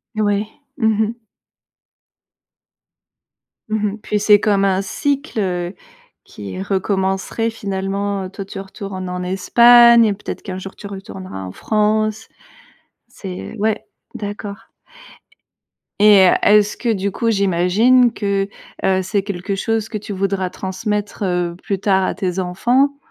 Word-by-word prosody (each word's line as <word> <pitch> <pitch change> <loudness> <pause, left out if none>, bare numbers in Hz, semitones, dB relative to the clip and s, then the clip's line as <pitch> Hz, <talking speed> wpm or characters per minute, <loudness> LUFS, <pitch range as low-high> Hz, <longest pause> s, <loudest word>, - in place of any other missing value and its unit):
Oui, 205 -1 0 0.3
mmh 225 -5 +2 0.2
mh. 220 +1 -2 2.6
Mmh 215 -1 0
mh. 215 - -8
Puis, 210 - -1
c'est 210 0 +5
comme 200 -2 +2
un 190 -1 +2
cycle, 280 +5 -2
heu, 180 -2 -2 0.5
qui 95 -2 -8
recommencerait 190 - -1
finalement. 195 -2 -3
Toi, 195 +1 -7
tu 195 0 -8
retournes 195 -1 -7
en 180 0 -4
Espagne, 235 +5 +6
et 210 - +2
peut-être 200 - -7
qu'un 185 -3 -6
jour, 190 +1 -8
tu 200 - -9
retourneras 190 - -8
en 90 - -7
France. 215 - 0 0.8
C'est 190 +2 -8
ouais, 215 +1 -1 0.3
d'accord. 205 -1 -7 1.3
Et 205 -3 +7
est-ce 210 0 +4
que, 240 - -2
du 200 -1 -2
coup, 230 +4 0
j'imagine 205 +6 +3
que, 200 -2 -1 0.4
heu, 190 0 +2
c'est 195 +1 -1
quelque 195 0 -4
chose 220 +2 -1
que 215 - -3
tu 205 0 -7
voudras 190 -1 -1
transmettre, 205 +1 -3
heu, 180 -2 -1
plus 195 -2 -2
tard 190 -1 +2
à - - -1
tes 185 -2 -3
enfants? 245 +10 +1
200 Hz, 130 wpm, -19 LUFS, 190-215 Hz, 2.6 s, Et